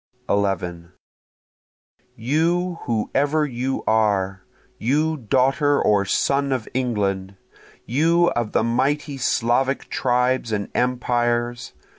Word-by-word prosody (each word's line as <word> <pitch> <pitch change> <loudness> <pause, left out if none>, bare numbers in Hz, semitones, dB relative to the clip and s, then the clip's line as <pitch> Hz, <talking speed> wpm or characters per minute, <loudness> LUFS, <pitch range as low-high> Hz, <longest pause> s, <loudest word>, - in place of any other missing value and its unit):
11 90 -4 -1 1.2
You 165 +8 0
whoever 140 +7 0
you 130 0 -3
are! 100 -3 +1 0.4
You 150 +7 +1
daughter 135 +4 +2
or 100 -1 +2
son 140 +7 +1
of 125 -4 -2
England! 100 -6 -2 0.5
You 165 +7 +2
of 120 -3 -2
the - - +1
mighty 140 +5 0
Slavic 130 +2 0
tribes 125 -1 +1
and 100 -2 -2
empires! 120 -1 -1
125 Hz, 95 wpm, -22 LUFS, 110-140 Hz, 1.2 s, daughter